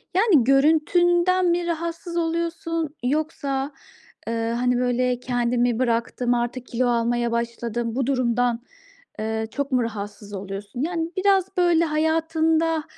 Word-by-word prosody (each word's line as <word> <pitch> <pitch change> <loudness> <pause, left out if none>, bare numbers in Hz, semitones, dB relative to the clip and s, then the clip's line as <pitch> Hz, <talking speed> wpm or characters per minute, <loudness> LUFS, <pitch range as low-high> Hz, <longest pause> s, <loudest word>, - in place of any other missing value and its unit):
Yani, 380 - +5
görüntünden 345 +6 +3
mi 345 0 +1
rahatsız 335 +1 -3
oluyorsun 330 -1 -2
yoksa, 280 -1 -1 0.5
eee, 230 - -1 0.2
hani, 250 0 +1
böyle, 250 0 +1
"Kendimi 245 -1 0
bıraktım, 240 0 0
artık 240 +1 -2
kilo 245 +1 0
almaya 235 0 +1
başladım." 235 0 -2
Bu 265 -1 0
durumdan, 245 -2 +1 0.6
eee, 220 0 -2
çok 280 -1 -3
mu 250 -2 +2
rahatsız 205 -2 -6
oluyorsun? 200 +4 -6
Yani, 330 +1 -2
biraz, 385 -1 +2
böyle, 345 -2 +4
hayatında 320 +1 +1
270 Hz, 120 wpm, -23 LUFS, 240-330 Hz, 0.6 s, Yani